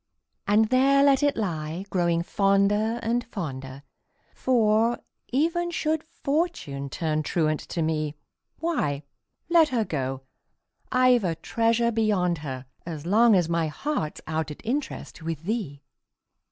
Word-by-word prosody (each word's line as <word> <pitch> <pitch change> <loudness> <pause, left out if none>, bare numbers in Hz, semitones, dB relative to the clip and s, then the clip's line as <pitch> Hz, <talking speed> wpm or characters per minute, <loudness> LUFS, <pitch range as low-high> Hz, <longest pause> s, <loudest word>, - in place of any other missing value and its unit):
And 215 +1 +4
there 275 +2 +4
let 280 -1 +5
it 290 -1 +2
lie, 170 -3 -3
growing 170 -2 +1
fonder 200 +4 +2
and, 235 +2 0
fonder 135 - -6 0.5
For, 230 -2 +2 0.3
even 335 +6 +1
should 315 -2 0
Fortune 295 - -2
turn 155 +1 -1
truant 155 0 0
to 165 - -1
me, 155 -1 -1 0.4
Why, 150 - -1 0.4
let 330 -2 +5
her 235 -4 0
go 135 -4 -3 0.7
I've 255 -2 +4
a 170 -3 0
treasure 230 +6 +1
beyond 200 -7 +1
her, 135 -3 -6 0.2
As 160 -3 -6
long 220 +4 +5
as 175 -3 +3
my 165 -1 0
heart's 155 - -3
out 160 0 -2
at 150 - -10
interest 265 - -3
With 160 -1 -4
thee! 175 -9 -3
200 Hz, 130 wpm, -26 LUFS, 155-250 Hz, 0.7 s, let